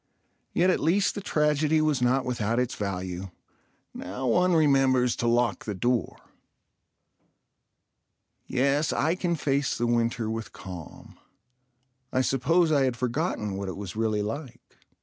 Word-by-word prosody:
Yet 185 +2 +3
at - - +1
least 190 +6 +2
the 205 - -5
tragedy 150 -2 +2
was 155 -4 +1
not 125 +2 +2
without 115 -2 -1
its 125 0 -1
value. 95 -2 -4 0.6
Now 100 +9 -6
one 180 +9 +3
remembers 135 -5 +3
to 120 - -1
lock 120 0 +1
the 105 - -3
door. 120 +5 0 2.3
Yes, 140 +4 +1
I 160 +3 +1
can 175 -1 -1
face 140 -2 0
the 120 - 0
winter 115 -1 0
with 110 0 -5
calm. 90 -4 -10 0.9
I 130 - +2
suppose 155 +6 +2
I 140 -3 +3
had 125 -3 -1
forgotten 120 - -2
what 100 -1 -4
it 95 - -6
was 100 -2 -7
really 110 -2 0
like. 120 +5 -7
125 Hz, 140 wpm, -27 LUFS, 110-150 Hz, 2.3 s, Yet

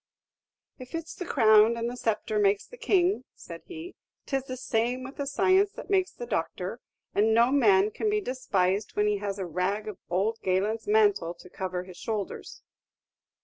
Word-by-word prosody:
"If 255 +4 -8
it's 330 0 -5
the 360 - -7
crown 220 -2 +5
and 230 0 -2
the 245 - -4
sceptre 220 -2 -1
makes 200 0 +2
the - - -13
king," 395 -5 +2
said - - -10
he, 350 0 -8 0.3
"'tis 270 -2 -2
the 255 -1 -6
same 245 +1 -1
with 270 +2 -9
the 280 - -3
science 380 +8 +3
that - - -9
makes 380 -1 +2
the 485 - -7
doctor; - - -3 0.3
and 220 +2 +3
no 235 +2 +5
man 210 -7 +4
can 430 - -1
be 420 0 +2
despised 210 - -1
when 210 - +2
he 210 -1 +2
has 200 -1 -3
a 190 - -3
rag 185 +5 -2
of 210 -4 -6
ould 205 +5 0
Galen's 200 +4 0
mantle 205 -5 +3
to 180 +1 -15
cover 185 -1 -4
his 180 -1 -12
shoulders." 210 0 -5
220 Hz, 185 wpm, -28 LUFS, 200-275 Hz, 0.3 s, crown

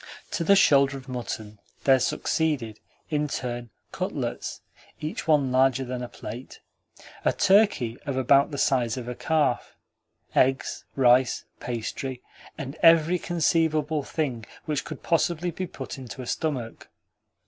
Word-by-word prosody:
To 170 - -1
the 200 +4 +5
shoulder 140 -7 +5
of 135 0 -12
mutton 110 -4 -5 0.2
there 135 -1 +5
succeeded, 130 -6 -1 0.3
in 150 -1 +1
turn, 120 -3 -4 0.2
cutlets - - -4 0.4
(each 155 +2 -5
one 145 -4 +3
larger 130 0 +3
than 125 0 -4
a 125 - -4
plate), 120 +5 -9 0.6
a - - +3
turkey 190 - +3
of 135 -2 -1
about 135 +2 +4
the 145 - -5
size 125 -4 +1
of 125 -2 -6
a 125 - -3
calf, 150 -2 0 0.6
eggs, 135 +1 +1
rice, 125 -1 +4
pastry, 125 +2 -4 0.4
and 140 0 -6
every 165 +1 +6
conceivable 160 -3 +1
thing 135 -5 -3 0.2
which 150 -3 -2
could 155 - -8
possibly 170 0 +1
be 185 +3 -4
put 135 -3 -7
into 130 0 -8
a - - -8
stomach. 125 -4 -3
135 Hz, 135 wpm, -26 LUFS, 125-155 Hz, 0.6 s, every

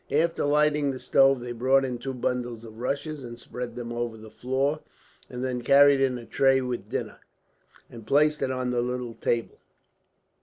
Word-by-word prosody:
After 165 +1 +1
lighting 150 0 +2
the 130 -1 -4
stove, 135 -1 +4
they 120 0 -6
brought 130 +3 +2
in 125 -2 -4
two 130 +2 -5
bundles 120 -2 -3
of 110 -1 -12
rushes 140 +3 -3
and 120 -1 -8
spread 125 +1 -7
them 120 -1 -5
over 120 -1 -3
the 110 0 -12
floor; 135 +4 -1 0.5
and 125 0 -6
then 125 -1 -2
carried 140 +1 +6
in 130 -2 +1
a 120 - -9
tray 135 +2 +3
with 120 -5 -4
dinner, - - -4 0.7
and 115 -2 -12
placed 150 +3 +3
it 135 - 0
on 130 -1 -2
the 120 -1 +1
little 125 -1 -3
table. 115 0 -2
125 Hz, 185 wpm, -26 LUFS, 120-135 Hz, 0.7 s, carried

